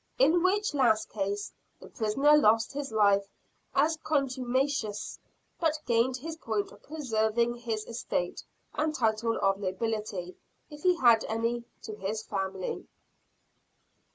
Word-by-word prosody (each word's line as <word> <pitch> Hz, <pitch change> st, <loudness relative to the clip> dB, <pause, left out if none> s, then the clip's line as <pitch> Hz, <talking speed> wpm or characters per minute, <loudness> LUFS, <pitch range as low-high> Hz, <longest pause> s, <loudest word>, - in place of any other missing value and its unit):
In 315 Hz, +7 st, +4 dB
which 405 Hz, +2 st, +2 dB
last 240 Hz, -6 st, +3 dB
case, 200 Hz, 0 st, -3 dB, 0.3 s
the -, -, -12 dB
prisoner 270 Hz, +8 st, +3 dB
lost 225 Hz, -4 st, +4 dB
his 280 Hz, -3 st, -4 dB
life 200 Hz, -2 st, +3 dB, 0.5 s
as 310 Hz, +3 st, +3 dB
contumacious; 260 Hz, -5 st, -1 dB, 0.4 s
but 320 Hz, -2 st, +1 dB
gained 240 Hz, +2 st, +2 dB
his 320 Hz, +5 st, -6 dB
point 220 Hz, -8 st, -2 dB
of -, -, -16 dB
preserving 235 Hz, -5 st, 0 dB
his 230 Hz, -3 st, -4 dB
estate, 225 Hz, -6 st, -3 dB, 0.3 s
and 310 Hz, 0 st, 0 dB
title 230 Hz, -2 st, +1 dB
of 195 Hz, 0 st, +3 dB
nobility 200 Hz, -2 st, -3 dB, 0.3 s
if 295 Hz, 0 st, -10 dB
he 360 Hz, +1 st, +4 dB
had 235 Hz, -6 st, +5 dB
any, 230 Hz, +2 st, -1 dB, 0.2 s
to 215 Hz, -, -6 dB
his 210 Hz, +2 st, -3 dB
family. 190 Hz, -2 st, -4 dB
230 Hz, 125 wpm, -29 LUFS, 215-280 Hz, 0.5 s, had